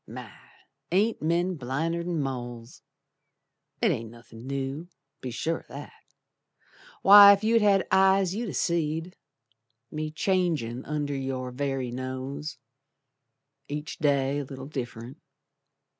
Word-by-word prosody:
My! - - -9 0.6
ain't 210 +6 +2
men 170 +3 0
blinder'n 165 +6 -2
moles? 120 -3 -5 1.0
It - - +5
ain't 115 0 -3
nothin' 115 +1 -13
new, 140 +4 -4 0.3
be 130 - -5
sure 160 +7 -2
o' - - -22
that. - - -10 1.0
Why, 200 0 +10
ef 200 +1 -2
you'd 225 +1 +3
had 200 -2 +4
eyes 190 -1 +4
you'd 225 +1 -3
ha' - - -6
seed 165 +1 -1 0.8
Me 155 0 -3
changin' 155 - -1
under 145 -1 -2
your 130 -1 -4
very 135 -1 -2
nose, 130 +4 -5 1.1
Each 150 +2 -6
day 140 -1 +1
a - - -3
little 135 -1 -9
diff'rent. 125 -1 -7
145 Hz, 120 wpm, -27 LUFS, 130-175 Hz, 1.1 s, Why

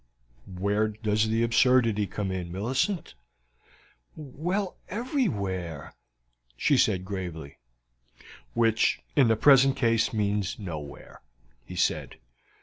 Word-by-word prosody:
"Where 100 +3 0
does 110 0 0
the 115 +1 +1
absurdity 115 -3 +3
come 100 -1 -4
in, 90 -2 -4
Millicent?" 130 - -2 1.0
"Well, 175 +7 -3
everywhere," 100 - -3 0.6
she - - +2
said 95 -1 +2
gravely. 90 -7 -6 1.0
"Which 115 -1 +2 0.2
in 135 -4 +5
the 110 - +3
present 135 +2 +5
case 115 -4 +1
means 105 -2 -1
nowhere," 80 -8 -8 0.4
he - - -10
said. - - -1
110 Hz, 100 wpm, -27 LUFS, 95-130 Hz, 1.0 s, in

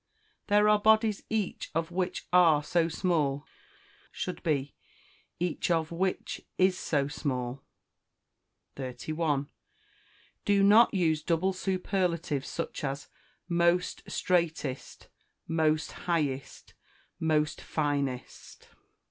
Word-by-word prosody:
"There 210 0 +4
are 210 0 +5
bodies 220 -1 +3
each 220 -3 -2
of 165 +1 -1
which 180 0 -2
are 165 -5 +6
so 165 +2 +1
small," 150 -5 0 0.7
should 180 - -5
be, 145 -5 -1 0.7
"each 175 0 -1
of 165 -2 +1
which 185 +2 -2 0.2
is 185 0 +4
so 145 -6 0
small." 130 -3 -3 1.2
31. 140 +3 -2 0.9
Do 200 -1 +3
not 215 +4 +7
use 160 -5 +1
double 170 +4 +1
superlatives, 180 -6 -1
such - - -4
as 140 0 -4 0.4
most 170 +1 +2
straightest, 160 -7 -1 0.4
most 155 -2 +1
highest, 145 -6 -3 0.5
most 155 -2 +1
finest. 140 -4 -3
165 Hz, 95 wpm, -29 LUFS, 145-185 Hz, 1.2 s, not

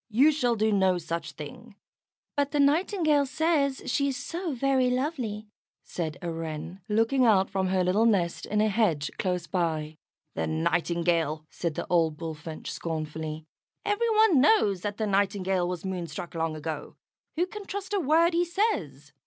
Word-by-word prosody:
"You 265 +8 +5
shall 250 -6 +1
do 220 0 +1
no 190 -3 +3
such 170 0 -4
thing." - - -10 0.6
"But 285 -1 +1
the 295 - -1
Nightingale 305 0 +3
says 290 -2 +1
she 280 - +1
is 270 -2 -2
so 340 +5 -4
very 265 -1 +2
lovely," 250 -5 -2 0.4
said 160 -3 -4
a 170 - -2
Wren, 165 +3 -6
looking 225 +5 +2
out 200 -5 +4
from 190 -1 0
her 185 0 +2
little 200 +6 +3
nest 170 -6 +1
in 210 0 +1
a 215 - +3
hedge 195 -9 +1
close 180 -2 -1
by. 160 -4 -2 0.4
"The 80 - -2
Nightingale!" 165 - 0
said 170 -3 -3
the - - -3
old 165 -3 +2
Bullfinch, 160 -1 -6
scornfully. 155 -1 -4 0.4
"Every 415 +3 +1
one 430 - +5
knows 210 - +4
that 205 +1 -3
the 220 - -1
Nightingale 195 -2 +1
was 180 0 -4
moonstruck 175 -2 -5
long 165 -1 -1
ago. 155 -1 -5 0.4
Who 345 +3 +2
can 405 +2 -9
trust 395 0 -5
a 405 - +2
word 330 +2 +3
he 345 +1 +3
says?" 195 - -1
200 Hz, 165 wpm, -27 LUFS, -, 0.6 s, You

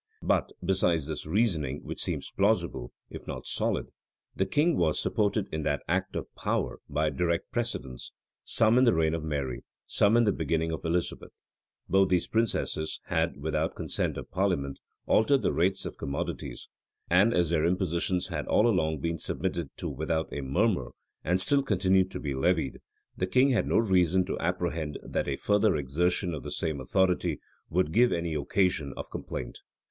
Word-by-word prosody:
But, - - +1
besides 90 -5 +2
this 75 0 -5
reasoning, 80 - 0
which - - -6
seems - - -3
plausible, - - +1 0.2
if - - -9
not - - -5
solid, - - -1 0.5
the 95 - 0
king 150 - +2
was 80 -3 +1
supported 105 -1 +1
in 80 - -2
that 75 -1 -1
act 95 +3 -1
of - - -2
power - - -2
by 75 +1 +1
direct 85 -1 -1
precedents, 115 - -3 0.3
some 115 +2 +3
in 130 - +5
the 115 - +4
reign 80 -1 +2
of 80 -1 -2
Mary, 70 -5 -3 0.2
some 105 +3 +3
in 120 - +5
the 105 - +3
beginning 80 -3 -1
of 80 - -4
Elizabeth.[] 85 +1 -1 0.6
Both 95 0 +4
these 90 -2 +2
princesses 110 -8 -1
had, 85 0 0
without 80 +2 -1
consent - - -2
of - - -8
parliament, 90 -8 0 0.3
altered 130 +5 +3
the - - +2
rates 95 +3 +1
of - - -7
commodities; 70 0 -4 0.4
and 95 +6 +5
as 85 -6 +2
their 80 -2 +2
impositions 90 +1 0
had 80 -4 -3
all 105 - +4
along 80 - +1
been 85 0 -2
submitted 85 -5 -2
to - - -4
without 80 +1 -2
a 70 - -3
murmur, 90 - 0 0.3
and 90 +3 +1
still 140 +8 +3
continued 95 -5 +2
to - - -6
be 70 -2 -3
levied, 80 +1 0 0.4
the 90 - -1
king 130 +8 +4
had 120 - +1
no - - +2
reason 95 -4 +3
to - - -3
apprehend 85 -3 -2
that - - -2
a 70 - 0
further 105 +4 +2
exertion 85 +6 0
of 75 - -4
the - - -6
same 80 -4 -2
authority 95 +6 +1 0.3
would 90 -2 +1
give 120 +6 +4
any 85 -1 -1
occasion 75 -1 0
of - - -7
complaint. - - -6
85 Hz, 175 wpm, -28 LUFS, 80-95 Hz, 0.6 s, in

